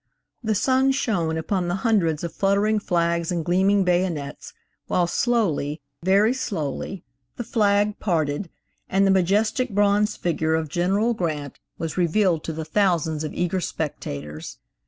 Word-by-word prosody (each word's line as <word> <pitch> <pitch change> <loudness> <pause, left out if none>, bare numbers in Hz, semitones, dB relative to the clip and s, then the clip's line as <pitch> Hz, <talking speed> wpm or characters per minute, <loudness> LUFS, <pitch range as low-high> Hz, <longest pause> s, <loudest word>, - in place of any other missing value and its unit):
The 220 -1 0
sun 260 +5 +3
shone 175 -11 0
upon 175 +3 -1
the 175 - 0
hundreds 170 -9 +2
of 170 - -4
fluttering 200 +2 +2
flags 170 -3 0
and 170 -3 -2
gleaming 190 +3 +3
bayonets, 175 -6 -1 0.4
while 175 - +2
slowly, 170 - 0 0.2
very 200 +6 +4
slowly, 185 - -4 0.3
the 240 - -4
flag 210 -3 +1
parted 165 -2 -1 0.4
and 195 +1 +3
the 195 - +4
majestic 210 +7 +2
bronze 205 +1 +2
figure 160 -2 0
of 160 -1 -2
General 195 +8 +1
Grant 155 - -3 0.2
was 165 +1 -4
revealed 180 -1 +2
to - - -2
the 160 0 -5
thousands 165 -6 +1
of 155 - -4
eager 180 +1 0
spectators. 75 - -5
180 Hz, 140 wpm, -23 LUFS, 160-205 Hz, 0.4 s, very